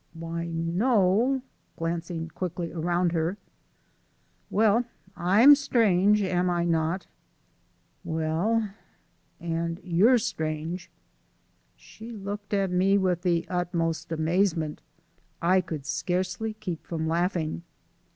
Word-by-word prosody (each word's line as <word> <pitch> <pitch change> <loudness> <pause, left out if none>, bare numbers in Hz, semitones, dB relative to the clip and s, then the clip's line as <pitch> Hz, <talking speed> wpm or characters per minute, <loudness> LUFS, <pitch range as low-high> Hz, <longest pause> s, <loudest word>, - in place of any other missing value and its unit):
"Why, 165 +1 -4
no 200 +8 +2 0.2
" - - -42
glancing 165 0 -3
quickly 175 0 -4
around 175 +1 0
her. 165 +3 -1 1.1
"Well, 220 +3 +3 0.3
I'm 205 +11 +7
strange, 210 -7 +3
am 180 -1 +1
I 175 -1 +1
not?" 165 +2 0 1.0
"Well 165 +8 0 0.4
" - - -41
"And 170 0 -2
you're 190 +8 +4
strange." 165 -6 -3 0.9
She 225 +2 -12
looked 205 -1 -6
at 195 -2 +1
me 190 +2 +3
with 185 -3 +1
the 175 -2 +1
utmost 170 -2 -2
amazement. 165 -1 0 0.6
I 185 +2 +3
could 155 -6 -6
scarcely 180 +7 -2
keep 185 -7 -6
from 160 -2 -2
laughing. 170 -1 -1
175 Hz, 105 wpm, -27 LUFS, 165-200 Hz, 1.1 s, I'm